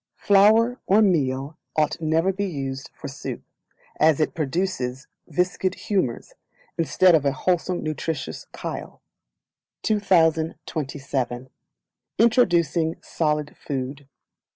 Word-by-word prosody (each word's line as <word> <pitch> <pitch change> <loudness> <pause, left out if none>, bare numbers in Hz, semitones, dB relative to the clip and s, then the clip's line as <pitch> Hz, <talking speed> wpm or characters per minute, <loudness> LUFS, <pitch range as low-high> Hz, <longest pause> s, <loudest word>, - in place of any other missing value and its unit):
Flour 220 +5 +4
or 210 +3 +5
Meal 140 -5 0 0.2
ought 155 +1 +1
never 165 +4 +2
to 190 - -14
be 200 - 0
used 135 -5 -5
for - - -8
soup, - - -6 0.6
as 155 -1 +4
it 155 - +1
produces 140 -4 -2 0.2
viscid 180 +1 0
humours, 185 - -2 0.4
instead 175 +2 +4
of 155 -3 +4
a 140 - +2
wholesome 175 +5 -1
nutritious 155 - -4
chyle. - - -6 0.8
2027 155 - 0 0.7
Introducing 170 - +3
Solid 150 -2 -1
Food. 135 0 -5
160 Hz, 105 wpm, -24 LUFS, 140-185 Hz, 0.8 s, or